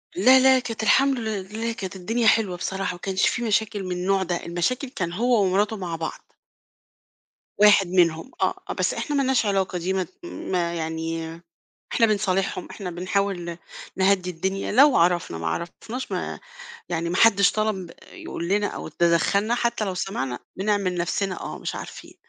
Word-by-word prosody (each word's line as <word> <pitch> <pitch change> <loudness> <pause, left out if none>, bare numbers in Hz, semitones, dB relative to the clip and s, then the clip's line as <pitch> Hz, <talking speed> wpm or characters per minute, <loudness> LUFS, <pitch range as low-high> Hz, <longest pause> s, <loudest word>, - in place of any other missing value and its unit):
لا، 255 +8 +6
لا 260 0 +6
كانت 230 -3 -5
الحمد 270 +3 +4
لله 220 +1 -3
كانت 195 -5 -6
الدنيا 225 +5 0
حلوة 205 -6 +3
بصراحة، 190 +1 -2
ما 175 - -11
كانش 190 +1 +1
في 240 - -1
مشاكل 215 -2 0
من 185 - -5
النوع 190 +2 +1
ده 175 -1 -3
المشاكل 175 - -1
كان 170 -8 -4
هو 235 +3 +2
ومراته 205 +3 +1
مع 175 -3 -4
بعض. 160 0 -5 1.4
واحد 205 -2 +6
منهم، 170 +4 +2
آه، - - 0
آه، - - -1
بس - - 0
إحنا 295 - -3
ما 275 - +2
لناش 260 -4 +2
علاقة 195 -2 0
دي 180 +2 -2
ما 190 -1 0
ت - - -15
ما 180 - -2
يعني 165 0 -4 0.5
إحنا 230 - +4
بنصالحهم 195 -3 0
إحنا 185 -4 -6
بنحاول 185 +1 -1
ن 170 -1 -5 0.4
نهدّي 190 -1 +2
الدنيا 190 +3 -3
لو 275 +5 +6
عرفنا 175 - +2
ما 80 - -4
عرفناش 175 - -5
ما - - -3 0.5
يعني 170 -1 -2
ما 180 - -1
حدش 200 -3 +5
طلب 210 -5 -1 0.2
يقول 170 - -6
لنا 205 +2 +2
أو - - -6
تدخّلنا 175 +7 +2
حتّى 235 -3 0
لو 190 - -3
سمعنا 135 -10 -3 0.2
بنعمل 200 -2 0
نفْسنا 185 +2 -1
آه، - - -6
مش - - -4
عارفين، - - -9
190 Hz, 170 wpm, -24 LUFS, 175-220 Hz, 1.4 s, لا